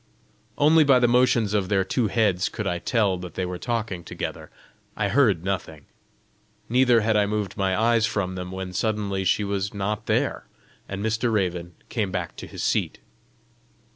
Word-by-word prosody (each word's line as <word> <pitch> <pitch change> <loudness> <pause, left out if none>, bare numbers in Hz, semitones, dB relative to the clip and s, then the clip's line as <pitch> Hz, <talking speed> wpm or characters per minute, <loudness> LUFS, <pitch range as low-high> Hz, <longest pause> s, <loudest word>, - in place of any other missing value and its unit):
Only 155 +2 +5
by 140 -3 +5
the 125 -1 +4
motions 120 -3 +3
of 100 -3 0
their 95 -2 +2
two 110 +5 0
heads 100 -4 +1
could - - -5
I 85 - -1
tell 100 -3 +1
that 90 -2 -9
they 95 - -1
were 90 0 -5
talking 115 -7 -3
together; - - -6 0.5
I 100 -2 0
heard 105 - +3
nothing. 85 -6 -4 0.8
Neither 125 -1 +4
had 110 0 +1
I 105 -1 +3
moved 105 -2 -2
my 95 -1 0
eyes 115 0 +3
from 100 -5 -2
them, 90 -1 -5
when 95 -1 -5
suddenly 100 -1 -1
she 95 +3 +2
was 100 0 -2
not 100 +1 -3
there, - - 0 0.4
and 100 +2 -4
Mr. 110 +2 0
Raven 90 -5 -1
came 105 -5 -1
back 90 -3 -4
to - - -8
his - - -6
seat. - - 0
100 Hz, 175 wpm, -24 LUFS, 95-115 Hz, 0.8 s, Only